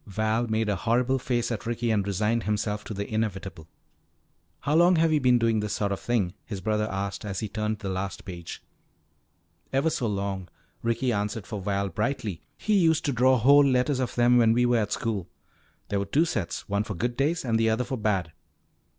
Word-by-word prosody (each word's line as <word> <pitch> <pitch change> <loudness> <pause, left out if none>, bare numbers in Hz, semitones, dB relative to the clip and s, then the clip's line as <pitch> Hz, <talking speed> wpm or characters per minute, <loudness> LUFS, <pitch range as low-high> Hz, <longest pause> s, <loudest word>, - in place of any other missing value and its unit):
Val 110 +4 0
made 110 0 0
a 105 - +1
horrible 125 +6 +1
face 120 -1 -1
at 115 0 -4
Ricky 120 0 -1
and 100 -2 +1
resigned 105 +4 +1
himself 105 0 -1
to - - -5
the 100 +1 -3
inevitable. 95 -6 -3 0.9
"How 145 - -1
long 175 +3 +5
have 165 -1 +3
you 150 - +3
been 125 -1 +5
doing 115 -2 +2
this 105 -1 -2
sort 100 -1 -1
of 100 - -2
thing?" 105 -7 0
his 100 -4 -6
brother 105 +3 0
asked 100 0 -4
as 100 -2 -4
he 110 - -2
turned 105 +1 -2
the 100 -2 -5
last 95 +1 -4
page. 85 -3 -8 1.1
"Ever 140 +4 +2
so 125 - -1
long," 100 -3 -3 0.3
Ricky 120 +2 0
answered 105 0 -2
for 105 -1 -5
Val 100 0 -1
brightly. 105 -2 -2 0.2
"He 215 - -1
used 165 -1 +3
to 145 - +1
draw 130 +2 +4
whole 140 +5 +6
letters 130 0 +2
of 130 - -2
them 120 0 +5
when 115 -1 +5
we 125 +1 +3
were 120 -1 +3
at 105 -2 -2
school. 105 -7 -2 0.6
There 100 - 0
were 100 - -1
two 145 +12 +2
sets, 105 - -3
one 100 +1 0
for 105 -2 -5
good 120 +7 -2
days 145 +4 0
and 115 -2 +1
the 115 0 +3
other 110 +3 +1
for 125 +2 -4
bad." 95 -6 0
110 Hz, 210 wpm, -26 LUFS, 100-125 Hz, 1.1 s, whole